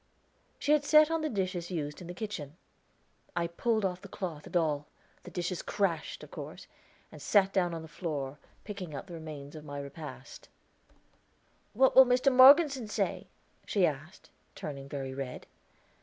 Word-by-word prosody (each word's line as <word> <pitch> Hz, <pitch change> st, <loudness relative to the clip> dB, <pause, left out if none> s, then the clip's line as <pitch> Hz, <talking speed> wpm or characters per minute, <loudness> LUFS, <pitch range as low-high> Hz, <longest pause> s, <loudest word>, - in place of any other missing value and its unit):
She 290 Hz, -, 0 dB
had 300 Hz, -1 st, +4 dB
set 305 Hz, +1 st, +6 dB
on 325 Hz, -1 st, 0 dB
the 310 Hz, -, -1 dB
dishes 185 Hz, -5 st, -2 dB
used 150 Hz, -3 st, -4 dB
in 175 Hz, -, -8 dB
the 175 Hz, -, -7 dB
kitchen. 175 Hz, -8 st, -6 dB, 0.8 s
I 175 Hz, -1 st, +1 dB
pulled 215 Hz, +5 st, 0 dB
off 180 Hz, -1 st, -2 dB
cloth 180 Hz, -6 st, -6 dB
and -, -, 0 dB
all 150 Hz, -3 st, 0 dB, 0.3 s
the -, -, -11 dB
dishes 175 Hz, 0 st, -3 dB
crashed, 175 Hz, -6 st, -2 dB
of -, -, -12 dB
course -, -, -8 dB, 0.5 s
and -, -, -12 dB
sat 195 Hz, -2 st, +3 dB
down 175 Hz, -3 st, +1 dB
on 165 Hz, -, -6 dB
the -, -, -9 dB
floor, 150 Hz, -3 st, -4 dB, 0.2 s
picking 190 Hz, -7 st, -7 dB
out -, -, -6 dB
the 180 Hz, -, -11 dB
remains 155 Hz, -3 st, -8 dB
for 155 Hz, -, -8 dB
my 145 Hz, -1 st, -7 dB
repast. 140 Hz, +2 st, -9 dB, 1.2 s
"What 260 Hz, +4 st, +4 dB
will 265 Hz, -1 st, +9 dB
Mr. 255 Hz, +2 st, +3 dB
Morgeson 275 Hz, -1 st, +7 dB
say?" -, -, -2 dB, 0.4 s
she 195 Hz, -4 st, +3 dB
asked, 155 Hz, +5 st, -5 dB, 0.2 s
turning 140 Hz, -2 st, -7 dB
very 135 Hz, -2 st, -4 dB
red. 130 Hz, -2 st, -6 dB
175 Hz, 165 wpm, -30 LUFS, 150-210 Hz, 1.2 s, will